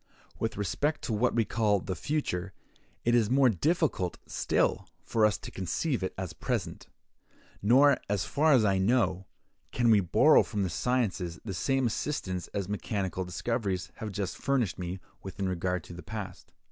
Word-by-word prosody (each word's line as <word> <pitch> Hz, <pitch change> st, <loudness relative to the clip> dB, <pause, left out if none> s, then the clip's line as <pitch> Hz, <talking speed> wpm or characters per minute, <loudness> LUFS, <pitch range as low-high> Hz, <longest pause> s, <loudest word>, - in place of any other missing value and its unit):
With 110 Hz, -2 st, -2 dB
respect 145 Hz, -, -1 dB
to 115 Hz, -, -2 dB
what 115 Hz, +4 st, +1 dB
we 115 Hz, -2 st, +3 dB
call 105 Hz, -3 st, +2 dB
the 95 Hz, 0 st, -4 dB
future, 95 Hz, -, -2 dB, 0.5 s
it 120 Hz, -, +3 dB
is 115 Hz, -3 st, +3 dB
more 130 Hz, 0 st, +5 dB
difficult 140 Hz, -, 0 dB
still -, -, 0 dB, 0.2 s
for 110 Hz, -2 st, +3 dB
us 105 Hz, -, -1 dB
to -, -, -9 dB
conceive 115 Hz, -, -2 dB
it 95 Hz, -, -2 dB
as 95 Hz, -3 st, -4 dB
present; 80 Hz, -, -3 dB, 0.7 s
nor, 135 Hz, +6 st, +5 dB
as 100 Hz, -3 st, 0 dB
far 155 Hz, +2 st, +2 dB
as 120 Hz, -5 st, +5 dB
I 95 Hz, -2 st, +2 dB
know, 95 Hz, -3 st, +1 dB, 0.4 s
can 120 Hz, -2 st, +3 dB
we 105 Hz, -, +6 dB
borrow 90 Hz, -3 st, +5 dB
from 100 Hz, -1 st, -2 dB
the 90 Hz, -, -2 dB
sciences 95 Hz, -8 st, -1 dB
the 100 Hz, -, -4 dB
same 135 Hz, +8 st, +1 dB
assistance 105 Hz, -, -2 dB
as 100 Hz, -2 st, -4 dB
mechanical 100 Hz, -2 st, -2 dB
discoveries 95 Hz, -2 st, -2 dB
have 110 Hz, -1 st, -5 dB
just 100 Hz, -1 st, -3 dB
furnished 125 Hz, -11 st, 0 dB
me 90 Hz, +1 st, -4 dB, 0.2 s
with 95 Hz, -1 st, -8 dB
in 95 Hz, -, 0 dB
regard 90 Hz, -1 st, -1 dB
to 85 Hz, -, -11 dB
the 85 Hz, -, -8 dB
past. 100 Hz, -3 st, -7 dB
105 Hz, 170 wpm, -29 LUFS, 95-120 Hz, 0.7 s, we